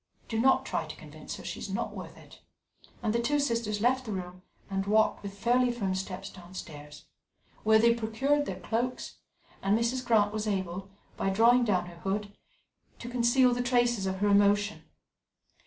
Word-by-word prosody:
"Do 225 - -2
not 265 +3 +4
try - - -2
to - - -8
convince - - -9
her. - - -10
She - - -5
is - - -6
not - - -3
worth - - -9
it," - - -16 0.6
and 215 -2 +1
the 235 - +1
two 290 +5 +1
sisters 230 -6 -1
left 255 +2 +2
the - - -3
room 185 -1 -6 0.3
and 195 0 -2
walked 215 +1 +3
with 200 0 -8
fairly 245 +3 +2
firm 200 -6 -2
steps 190 +1 -5
downstairs, 150 -5 -10 0.6
where 220 0 +5
they 235 +1 +5
procured 260 +6 0
their 185 -1 -4
cloaks, 235 +7 -3 0.4
and 200 +2 +2
Mrs. 240 +3 0
Grant 210 -4 +3
was 215 0 -2
able, 190 -1 -3 0.3
by 195 - 0
drawing 235 +5 +5
down 185 -5 +1
her 175 -1 -11
hood, 200 +2 -3 0.6
to 240 - -8
conceal 245 +1 +3
the 245 - -1
traces 240 -4 +2
of 190 0 -2
her 205 - +3
emotion. 205 +1 +3
215 Hz, 180 wpm, -29 LUFS, 195-240 Hz, 0.6 s, where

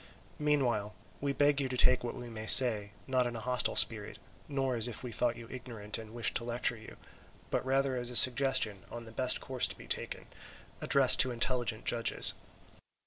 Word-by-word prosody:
Meanwhile 125 -9 -2 0.2
we 140 0 -3
beg 145 0 0
you 135 - -4
to 125 - -5
take 125 0 +2
what 120 - -6
we 120 - -10
may 110 -1 -9
say, 105 -4 +5
not 130 -2 -1
in 120 - -7
a - - -6
hostile 125 +2 -1
spirit, 105 -2 +4 0.3
nor 135 -3 -3
as 115 0 -1
if 120 0 -9
we 125 - -7
thought 120 +1 -2
you 115 0 -12
ignorant 115 -5 -7
and 110 -1 -12
wished 115 -3 -1
to - - -7
lecture 120 +1 -2
you, 110 -1 -14 0.5
but - - -2
rather 135 0 -1
as 120 -1 -3
a 125 - -6
suggestion 125 -5 +4
on 120 0 -10
the 115 - -13
best 125 +2 0
course 130 -2 -3
to - - -11
be - - -14
taken, - - -4 0.6
addressed 135 -2 +5
to 130 - +4
intelligent 120 -2 -3
judges. 115 -1 +2
120 Hz, 195 wpm, -30 LUFS, 115-130 Hz, 0.6 s, say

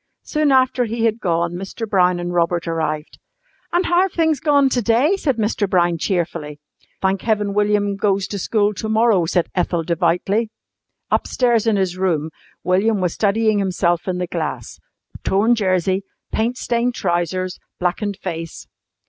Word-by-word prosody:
Soon 305 -2 +1
after 255 -1 +3
he 230 +1 -1
had 225 0 +1
gone 170 -3 0
Mr. 195 +5 -5
Brown 180 -3 +2
and 175 0 -4
Robert 170 0 0
arrived. 155 -2 -3 0.5
"And 350 +2 +1
how 350 +1 +3
have 380 -1 +1
things 320 -4 +1
gone 285 -2 +3
to 250 -1 0
day?" 240 - +3
said 280 - -1
Mr. 210 -2 0
Brown 175 -2 +2
cheerfully. 165 -5 -2 0.4
"Thank 190 0 +1
heaven 210 -3 0
William 205 -1 +1
goes 200 -1 +1
to 200 - -4
school 210 +2 +1
to 220 +2 -5
morrow," 220 -5 +3
said 175 0 0
Ethel 175 -2 0
devoutly. 180 +6 0 0.6
Upstairs 240 -3 +1
in 220 - +3
his 185 -2 -1
room 160 -4 0 0.3
William 195 +4 +2
was 180 -3 0
studying 215 0 +2
himself 175 -3 0
in 185 -1 -1
the 180 - -1
glass - - -5 0.4
torn 210 +5 +3
jersey, 190 -3 +1 0.3
paint 235 +3 -1
stained 240 0 -1
trousers, 180 +1 -1 0.2
blackened 190 +3 -1
face. 165 -3 -6
195 Hz, 155 wpm, -20 LUFS, 175-225 Hz, 0.6 s, after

